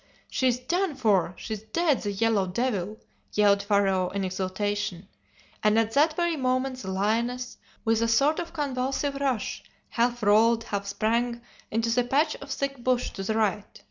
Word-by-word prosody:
"'She's 255 -2 +2
done 350 +5 -1
for! 200 -8 +2
she's 215 -2 -5
dead, 290 +6 +1
the 205 - -2
yellow 200 -1 +1
devil!' 210 -1 -2 0.4
yelled 200 -1 +4
Pharaoh 195 -3 +2
in 200 0 -3
exultation; 190 0 -2 0.5
and 210 +1 +3
at 225 -1 +2
that 305 +5 +3
very 345 -1 +1
moment 255 -1 -1
the 190 - -6
lioness, 235 +6 -1 0.3
with 225 0 +2
a 230 - +2
sort 275 +7 +3
of 340 -1 -5
convulsive 275 -1 -1
rush, 260 -7 -1 0.3
half 240 0 0
rolled, 225 +3 +4
half 200 -3 -4
sprang, 235 +4 0 0.3
into 230 +1 0
the 245 +1 +3
patch 290 +5 +2
of - - -11
thick 275 -3 -3
bush 250 -1 +1
to - - -7
the 215 +3 -1
right. 215 -2 -1
230 Hz, 165 wpm, -26 LUFS, 205-255 Hz, 0.5 s, yelled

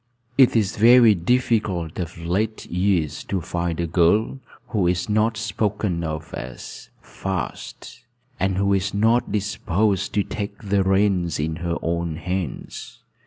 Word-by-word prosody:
It 130 -3 +5
is 105 -4 +1
very 115 0 +7
difficult 95 -4 0
of 85 -2 -5
late 95 +7 -2
years 90 -4 0
to 95 - -1
find 85 0 -3
a 85 - 0
girl 90 +10 +2 0.3
who 100 -7 +1
is 90 +1 0
not 110 +1 +1
spoken 105 -5 -1
of 80 0 -5
as 60 -1 -8
'fast,' 95 -3 -6 0.4
and 95 0 0
who 100 0 +2
is 95 0 0
not 115 +4 +2
disposed 100 -1 0
to 100 - +3
take 100 0 -5
the 100 -1 +1
reins 95 -4 +1
in 80 +1 -2
her 85 -1 -2
own 85 -1 -1
hands. 90 -1 -5
95 Hz, 140 wpm, -23 LUFS, 85-105 Hz, 0.4 s, very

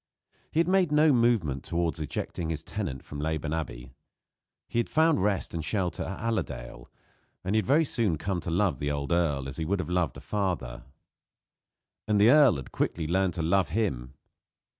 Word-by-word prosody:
He 160 - 0
had 170 - +3
made 185 -3 +3
no 150 0 +5
movement 115 - +2
towards 85 -1 -1
ejecting 80 +2 -4
his 80 -1 -3
tenant 95 -12 -4
from 75 - -7
Leyburn 80 0 -2
Abbey. - - -5 0.8
He 120 - -1
had 120 - -1
found 160 - +3
rest 100 -1 0
and 85 -2 -3
shelter 90 -2 -1
at 95 - -4
Allerdale, 110 - -4 0.6
and 95 +3 -1
had 110 -4 +1
very 155 +4 +4
soon 110 - +1
come 90 +2 -2
to - - -5
love 85 -5 +1
the 75 - -1
old 70 0 -3
earl 75 -6 +1
as 65 - -7
he 80 - -2
would 100 +4 0
have 90 - -4
loved 90 -3 0
a - - -7
father. 90 -12 -3 1.2
And 105 -1 +2
the 110 +4 +7
earl 145 -4 +6
had 65 -3 -7
quickly 80 - -1
learned 95 +1 +1
to 85 - -2
love 90 +3 +2
him. 70 - -2
90 Hz, 185 wpm, -28 LUFS, 75-110 Hz, 1.2 s, the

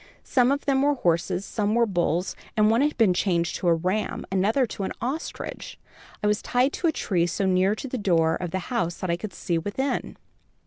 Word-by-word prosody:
Some 250 0 +3
of 285 +1 -1
them 270 -2 +2
were 290 +1 +3
horses, 180 -2 0
some 210 +1 -1
were 235 0 +4
bulls, 175 -3 0 0.2
and 215 0 +5
one 230 +3 +3
had 300 +1 +1
been 220 -6 +4
changed 170 -2 0
to 180 - -2
a 170 - +5
ram, 185 +6 -2
another 210 +8 +2
to 215 - -7
an 190 - -2
ostrich. 275 +6 -5 0.5
I - - +1
was 210 0 +2
tied 255 +3 +1
to 345 - 0
a - - +4
tree 180 - 0
so 195 +3 -1
near 190 +2 +3
to 270 - -6
the 255 -1 -4
door 165 -5 +2
of 180 - -4
the 190 +7 -4
house, 175 -8 0
that 185 - -2
I - - +2
could 195 +4 -6
see 170 -1 -2
within. 205 - -3
200 Hz, 220 wpm, -25 LUFS, 175-245 Hz, 0.5 s, and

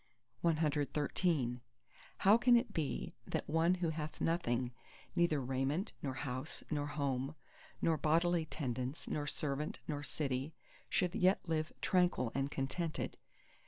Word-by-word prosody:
CXIV 150 -4 +1 0.6
How 200 +3 +6
can 240 +1 +6
it 240 +1 +2
be 155 -4 -2
that - - -2
one 165 +3 +3
who 175 -3 0
hath 155 -1 -5
nothing, 125 -7 +1 0.4
neither 170 -4 +3
raiment, 135 - -1
nor 135 -2 -2
house, 130 +1 -3
nor 145 -1 0
home, 140 -1 -1 0.5
nor 165 -1 +3
bodily 165 +2 +2
tendance, 130 -1 -3
nor 145 -1 -2
servant, 150 +1 -1
nor 145 -2 -2
city, 140 0 -2 0.3
should 180 -2 +1
yet 185 0 +3
live 155 -1 0
tranquil 175 -10 +2
and 135 +1 0
contented? 145 +5 -2
150 Hz, 125 wpm, -36 LUFS, 135-170 Hz, 0.6 s, How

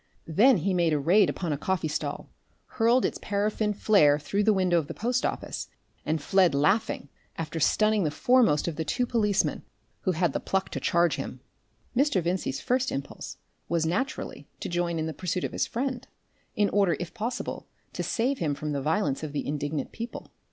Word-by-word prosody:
Then 215 - +5
he 190 +3 0
made 170 -3 +2
a 150 - +2
raid 185 +7 +4
upon 170 -5 -2
a 140 - -4
coffee 185 -2 -1
stall, 150 - -3 0.4
hurled 235 +2 +2
its - - -2
paraffin 210 +1 0
flare 195 -8 +4
through 195 +8 -1
the 215 - +4
window 185 -4 +3
of 150 - -5
the - - -7
post 245 +2 0
office, - - -3 0.4
and 155 +1 +1
fled 180 +1 +3
laughing, 170 0 +1 0.3
after 165 0 -4
stunning 215 +5 +3
the 155 - +1
foremost 225 - +3
of 160 -3 -3
the 160 - -1
two 245 - 0
policemen 210 -5 +1 0.4
who 185 - 0
had 170 -3 +1
the - - -1
pluck 190 0 -1
to - - -4
charge 170 0 +2
him. - - -5 0.6
Mr. 275 -5 +3
Vincey's 170 -6 -1
first 255 +1 0
impulse 140 0 -6 0.3
was 165 -1 +1
naturally 185 +12 -3
to - - -4
join 175 -1 -1
in 160 - -1
the 160 - -3
pursuit 180 +1 -2
of - - -2
his - - -1
friend, 255 +1 -3 0.5
in 205 -1 +3
order 195 -6 +2
if 175 - -5
possible 240 +3 -4 0.3
to - - -3
save 260 +4 0
him 150 -4 0
from 150 +1 -4
the 140 -1 -1
violence 155 -1 0
of 155 -2 -5
the 145 - -2
indignant 145 0 -3
people. 230 +1 -7
180 Hz, 195 wpm, -27 LUFS, 155-215 Hz, 0.6 s, Then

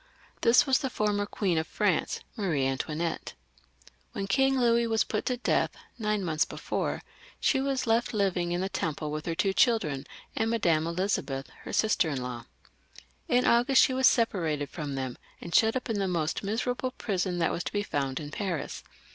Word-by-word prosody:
This 235 +1 +6
was 265 -1 +3
the 265 - -2
former 205 -3 0
Queen 185 -7 0
of 160 - -3
France, 200 -7 0
Marie 170 - 0
Antoinetta 155 +5 -2 0.8
When 195 - -3
King 270 +5 +2
Louis 235 -1 +3
was 225 -1 +2
put 215 - -3
to 250 - 0
death 245 - +1 0.2
nine 210 -2 0
months 155 -3 +1
before, - - -3 0.4
she 265 - +2
was 275 -1 -1
left 230 0 +2
Hving 190 -5 0
in 175 +1 0
the 190 - 0
Temple 155 -4 -3
with 155 +2 -4
her 165 - -1
two 190 +3 +1
children 155 - +2 0.3
and 225 - +1
Madame 170 -9 +2
Elizabeth, 170 -7 -2 0.2
her - - -5
sister 215 -6 +2
in 140 -3 -2
law. 120 -1 -6 0.8
In 250 +1 +3
August 245 +3 +5
she 260 - +2
was 260 0 +5
separated 160 - +1
from 150 -4 -4
them, 130 -2 -4 0.2
and 170 - -8
shut 220 +6 +4
up 255 - -2
in 220 -4 -1
the 195 - 0
most 165 -4 -1
miserable 245 +5 -1
prison 190 -7 -2
that 165 -1 +1
was 175 - -2
to - - -3
be 205 0 -1
found 135 -7 -2
in 145 -1 -7
Paris. 180 -7 -3
195 Hz, 185 wpm, -28 LUFS, 155-230 Hz, 0.8 s, This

